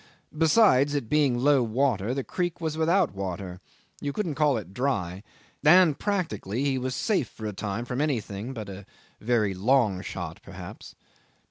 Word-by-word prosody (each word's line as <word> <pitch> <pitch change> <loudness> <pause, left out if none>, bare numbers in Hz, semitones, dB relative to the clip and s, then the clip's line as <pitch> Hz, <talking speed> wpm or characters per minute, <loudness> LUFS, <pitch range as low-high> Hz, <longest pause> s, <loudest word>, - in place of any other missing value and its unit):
Besides, 155 - +4
it 135 -6 -2
being 145 -5 +3
low 140 +2 +4
water, 120 -1 0
the 135 - -2
creek 175 +3 -3
was 160 -2 -2
without 165 - +2
water 95 -1 -5 0.4
you 145 - -2
couldn't 170 0 -2
call 145 -2 +2
it 95 -4 -7
dry 100 -7 -1 0.4
and 160 -1 +6
practically 140 - -2
he 135 -2 +1
was 130 0 -3
safe 200 - 0
for 110 - -9
a 105 - -3
time 105 +4 -4
from 125 +3 -2
everything 115 -6 -2
but 110 -5 -6
a 95 0 -9 0.3
very 110 -3 +1
long 105 -1 +2
shot 85 -5 -6
perhaps. - - -10
125 Hz, 160 wpm, -26 LUFS, 100-150 Hz, 0.4 s, and